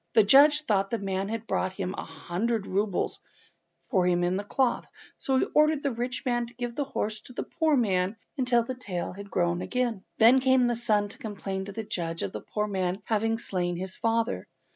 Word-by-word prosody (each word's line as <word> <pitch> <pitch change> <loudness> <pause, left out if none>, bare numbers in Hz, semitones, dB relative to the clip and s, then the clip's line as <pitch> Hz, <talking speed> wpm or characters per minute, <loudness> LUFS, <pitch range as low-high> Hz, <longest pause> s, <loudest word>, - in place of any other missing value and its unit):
The 220 - +6
judge 295 +7 +6
thought 195 -7 +1
the 230 - 0
man 195 -1 -2
had 225 0 -4
brought 185 -2 -2
a 190 - -1 0.2
hundred 210 +4 -2
roubles 200 0 -1 0.7
for 185 -3 +3
him 175 -1 +2
in 175 +1 +1
the 200 - -2
cloth, 250 +4 0 0.3
so 265 -2 +1
he - - +3
ordered 305 -1 +4
the 280 - +1
rich 245 +3 -4
man 240 -1 0
to 245 - -16
give 240 -1 -4
his 285 -2 -2
horse 215 -4 -2
to 250 - -13
the - - -3
poor 315 -3 +1
man 190 -3 +1 0.2
until 250 -4 +2
the 255 - -4
tail 190 -9 -4
was 200 +1 -8
grown 175 -2 0
again. 240 -5 -1
Then 235 +4 +7
came 260 -1 +4
the 240 0 +1
son 215 -3 +1
to 255 - -7
complain 195 -5 -4
to 200 - -7
the 225 +3 -5
judge 170 -5 -3
of 100 - -3
the 105 - -6
poor 210 0 -2
man 190 -2 -2
having 225 +1 +1
slain 180 -5 -2
his 185 +2 -4
father. 230 +1 0
220 Hz, 210 wpm, -28 LUFS, 190-245 Hz, 0.7 s, Then